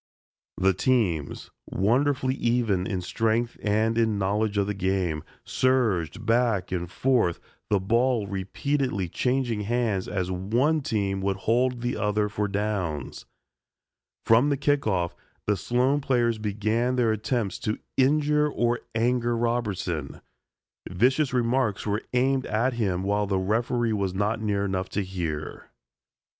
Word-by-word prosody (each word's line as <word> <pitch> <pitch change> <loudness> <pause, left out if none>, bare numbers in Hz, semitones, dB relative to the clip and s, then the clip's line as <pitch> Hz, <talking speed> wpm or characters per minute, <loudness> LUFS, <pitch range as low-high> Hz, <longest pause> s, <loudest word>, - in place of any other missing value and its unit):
The 95 +1 +3
teams, 95 - 0 0.2
wonderfully 130 +5 +1
even 115 -7 0
in 95 -3 -2
strength 115 +5 0
and 110 +2 +1
in 110 -2 +2
knowledge 100 +2 0
of 100 - +2
the 105 - -2
game, 95 -5 -1 0.2
surged 115 -6 +1
back 115 -5 +1
and 90 -2 -2
forth, 115 -5 +1 0.3
the 105 - +3
ball 115 +3 +1
repeatedly 100 - -2
changing 125 0 0
hands 110 -3 0
as 95 -2 -2
one 120 - +1
team 100 -6 -1
would 95 0 0
hold 125 +2 +2
the 120 +1 -2
other 105 0 0
for 105 0 -1
downs. 95 - -3 1.0
From 115 +6 +5
the 140 - +1
kick 145 -2 +1
off, 90 -4 0 0.3
the 105 - +2
Sloan 125 +8 +1
players 120 -4 +1
began 110 +4 0
their 120 -3 +2
attempts 110 -2 -1
to 105 - -2 0.2
injure 150 +2 +3
or 120 -3 0 0.2
anger 120 +1 +1
Robertson. 100 - -2 0.7
Vicious 125 - +2
remarks 125 -3 0
were 105 +1 0
aimed 130 +1 +2
at 115 +5 +1
him 95 -6 -1
while 100 +1 0
the 95 -1 0
referee 115 +4 0
was 100 -3 -1
not 105 +3 0
near 100 -2 0
enough 95 -1 -2
to 100 - -1
hear. 85 -5 -5
110 Hz, 135 wpm, -26 LUFS, 95-125 Hz, 1.0 s, From